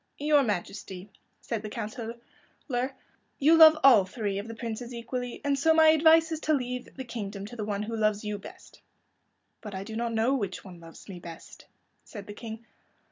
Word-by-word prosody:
"Your 295 0 +3
Majesty," 195 -3 -4 0.3
said 225 -3 -4
the 215 - -6
Councilor, 225 +1 -6 1.2
"you 310 +4 +5
love 320 -1 +9
all 245 -7 +8
three 200 +1 -3
of 205 - -7
the 230 - -7
princes 235 +1 -6
equally, 245 +1 -5
and 280 -1 +1
so 320 +3 +4
my 320 -1 +7
advice 320 +1 +5
is 320 - -2
to 310 -1 +1
leave 250 -2 -5
the 265 - -6
kingdom 205 -5 -6
to 220 - -9
the 215 -3 -4
one 205 -1 -2
who 225 +2 -4
loves 215 -1 +1
you 210 -1 -3
best." - - -14 0.8
"But 210 -3 -8
I 190 - -4
do 220 +2 -8
not 235 +1 -2
know 225 +4 +1
which 200 -9 -3
one 180 -3 -11
loves 165 -1 -14
me 190 -3 -8
best," 170 -1 -12 0.4
said 205 -3 -10
the 205 - -8
King. 225 +1 -9
230 Hz, 190 wpm, -28 LUFS, 205-265 Hz, 1.2 s, love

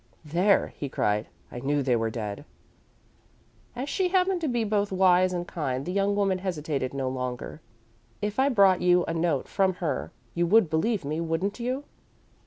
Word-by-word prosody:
"There," 180 +6 +2
he 140 - -4
cried. 105 -3 0 0.2
"I 120 - -6
knew 140 +2 0
they 125 -2 +2
were 115 -1 0
dead!" 105 -3 -5 1.3
As 255 +3 -4
she 370 +5 0
happened 365 0 +1
to 320 - 0
be 240 -3 0
both 205 -1 0
wise 185 -1 +4
and 175 -1 -3
kind, 135 -5 -3
the 180 - -3
young 200 +1 +1
woman 195 -2 +1
hesitated 150 -8 -2
no 135 -1 -3
longer. 125 +3 -4 0.6
"If 210 +3 -3
I 270 +1 +4
brought 195 -7 +4
you 180 0 +4
a 165 - -3
note 165 -5 0
from 190 -2 +1
her 165 -7 -3 0.2
you 175 0 +1
would 205 -2 +4
believe 185 +3 0
me, 155 +3 -2
wouldn't 170 +7 -2
you?" 255 +4 -2
180 Hz, 180 wpm, -27 LUFS, 145-205 Hz, 1.3 s, wise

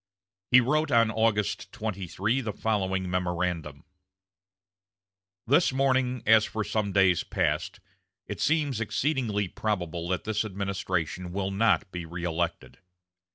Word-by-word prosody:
He 125 0 +7
wrote 150 +5 +1
on 115 -4 +4
August 110 -2 0
23 105 +3 -2
the 110 -4 -4
following 95 -3 -1
memorandum: 90 -5 -2 1.6
"This 145 +6 +4
morning, 130 -2 +1
as 110 -1 +6
for 110 0 -3
some 105 -1 -1
days 95 -3 +3
past, - - -1 0.5
it 100 - -6
seems 145 -6 +1
exceedingly 110 -2 0
probable 90 -4 -3
that 95 - -1
this 110 0 -1
administration 95 -3 -3
will 95 +1 -2
not 100 -2 +2
be 90 -1 -5
reëlected. 85 0 -3
105 Hz, 115 wpm, -27 LUFS, 90-115 Hz, 1.6 s, He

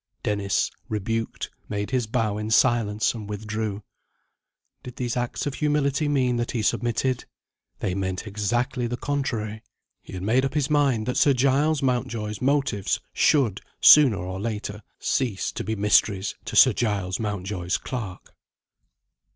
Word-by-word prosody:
Dennis, 100 -1 0 0.2
rebuked, 115 +2 -3 0.2
made 105 +2 -3
his 125 -4 0
bow 110 -3 -1
in 105 0 -4
silence, 110 -2 +2
and 110 -3 -8
withdrew. 105 0 -4 1.0
Did 125 -1 -10
these 120 -2 -2
acts 120 -1 -2
of 145 - -2
humility 145 0 +1
mean 130 -4 +1
that 120 0 -2
he 115 -3 -1
submitted? 120 +3 0 0.6
They 90 - -1
meant 95 +1 -3
exactly 120 +5 -1
the 120 +1 -3
contrary. 115 -6 -3 0.4
He - - -13
had 90 -1 -5
made 120 +6 +2
up 135 +2 -2
his 150 0 0
mind 140 -7 +2
that 125 - -2
Sir 140 - +5
Giles 140 +3 +2
Mountjoy's 115 -4 -1
motives 135 -7 +1
should, 125 -10 +2 0.2
sooner 140 -9 +8
or 95 0 -5
later, 105 -1 -4 0.2
cease 120 -8 -1
to - - -5
be 110 +2 -2
mysteries 100 -1 +2
to - - -5
Sir - - +7
Giles 100 -5 -1
Mountjoy's 95 -4 -2
clerk. 110 -8 -7
115 Hz, 145 wpm, -25 LUFS, 105-130 Hz, 1.0 s, sooner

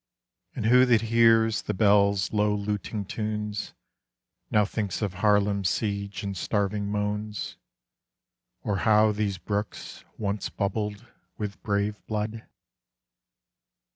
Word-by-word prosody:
And - - -3
who 125 +3 +6
that 115 -3 +4
hears 115 -1 +4
the - - -3
bells' 100 -1 +3
low 105 0 +2
luting 105 0 -3
tunes, 105 -1 -4 0.7
Now 105 -1 +3
thinks 105 0 -3
of 100 -3 -1
Haarlem's 100 0 +2
siege 100 -2 -2
and 100 -1 -3
starving 100 +2 -1
moans, 105 0 -3 1.1
Or 100 -2 -1
how 110 +1 +4
these 105 -2 -1
brooks 100 +4 -4
once 105 -1 -2
bubbled 105 +2 -3 0.3
with 105 -2 -5
brave 105 -1 -1
blood? 110 +1 -3
105 Hz, 110 wpm, -27 LUFS, 100-110 Hz, 1.1 s, who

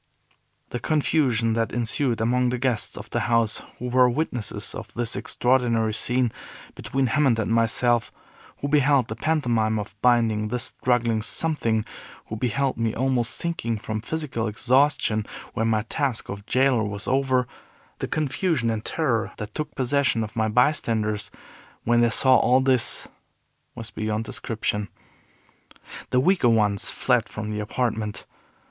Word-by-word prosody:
The 120 - -3
confusion 130 -5 +1
that 115 0 0
ensued 120 +1 +1
among 125 +2 +2
the 125 - -1
guests 125 -3 -1
of - - -9
the - - 0
house 115 -2 +2 0.2
who 125 - -5
were 125 0 +5
witnesses 125 -5 -3
of - - -8
this 120 -1 -2
extraordinary 120 -3 +1
scene 125 +1 +1 0.4
between 135 0 -1
Hammond 130 -2 +2
and 110 -1 -1
myself, 115 +1 +2 0.5
who 140 - -1
beheld 140 -3 +3
the 110 - -4
pantomime 115 -7 +1
of 105 -1 -5
binding 115 -3 +3
this 125 +2 -1 0.2
struggling 120 -3 +2
Something, 115 -4 -1 0.4
who 110 - -6
beheld 125 +3 -1
me 115 -1 -1
almost 125 -2 0
sinking 115 -10 -2
from 110 +1 -4
physical 130 -4 -3
exhaustion 125 -1 +2 0.3
when 115 - 0
my 110 -1 +1
task 130 -1 -2
of 100 +1 -7
jailer 130 -2 +3
was 100 -1 -4
over, 130 -1 +2 0.5
the - - -2
confusion 150 -4 0
and 110 -1 -3
terror 120 -8 -1
that 105 -1 -7
took 150 -1 -5
possession 130 -3 +1
of 105 -1 -7
the 110 -1 0
bystanders, 110 -4 +1 0.5
when 120 +1 +3
they 120 - +4
saw 130 +2 +5
all 125 +1 +4
this, 130 -2 +1 0.7
was 115 -2 -8
beyond 110 0 -2
description. 105 -2 -3 1.2
The 125 - +2
weaker 175 -3 +3
ones 105 -3 +2
fled 125 -3 +1
from 110 0 -5
the 105 - -3
apartment. 105 -1 -2
120 Hz, 145 wpm, -24 LUFS, 110-130 Hz, 1.2 s, were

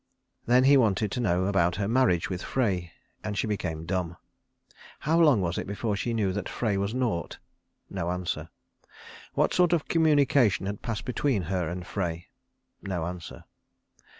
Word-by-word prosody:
Then 125 +2 +5
he 140 +1 +6
wanted 105 -4 +2
to 125 - -2
know 95 -6 +1
about 90 -3 +2
her 100 - -1
marriage 115 -8 +2
with 90 -2 -4
Frey, 95 -10 -1 0.3
and 105 -1 -3
she - - +1
became 90 -7 -3
dumb. 90 -1 -2 0.8
How 160 +3 +2
long 145 -11 +5
was 85 -1 -1
it - - -5
before 105 +1 -2
she 120 +4 -2
knew 105 -5 0
that 100 -1 -4
Frey 110 -4 -1
was 100 +1 -1
nought? 120 -9 -2 0.5
No 85 - -3
answer. 90 0 -3 0.9
What - - +2
sort 180 -1 +3
of 165 -4 0
communication 145 - +3
had 100 +1 -4
passed 115 -3 -4
between 125 -5 0
her 90 -1 -1
and 90 0 -5
Frey? 85 -4 -4 0.5
No 90 -5 -3
answer. 90 -1 -7
100 Hz, 165 wpm, -27 LUFS, 90-125 Hz, 0.9 s, he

